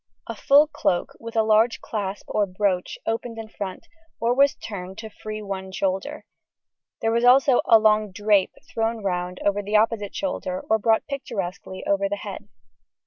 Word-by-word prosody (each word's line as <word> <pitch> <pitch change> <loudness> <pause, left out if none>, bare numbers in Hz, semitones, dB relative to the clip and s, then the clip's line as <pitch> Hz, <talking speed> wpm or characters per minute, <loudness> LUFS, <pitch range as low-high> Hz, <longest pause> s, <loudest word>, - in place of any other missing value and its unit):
A 230 - -5
full 280 +6 +5
cloak, 295 - -1
with 230 0 -8
a 220 - +4
large 220 +2 +3
clasp 200 -2 -4
or 205 -1 +1
brooch, 185 -1 -1
opened 230 +1 -3
in 225 -1 -6
front, 195 -3 -7 0.3
or 235 +1 +2
was 280 +2 +4
turned 190 -2 -7
to 220 0 -8
free 215 0 -7
one 190 -1 -5
shoulder; 195 +11 -2 0.8
there 225 - +2
was 235 +1 +1
also 255 +1 +6
a 225 - +7
long 215 -1 +3
"drape" 205 0 +2 0.2
thrown 225 -1 -1
round 180 -1 -2
over 205 0 +2
the 205 +1 -3
opposite 215 -1 +1
shoulder 185 -10 -3
or 220 - +3
brought 220 +1 +2
picturesquely 195 -9 -5
over 200 0 +1
the 205 - -1
head. 205 0 -8
215 Hz, 170 wpm, -24 LUFS, 195-230 Hz, 0.8 s, a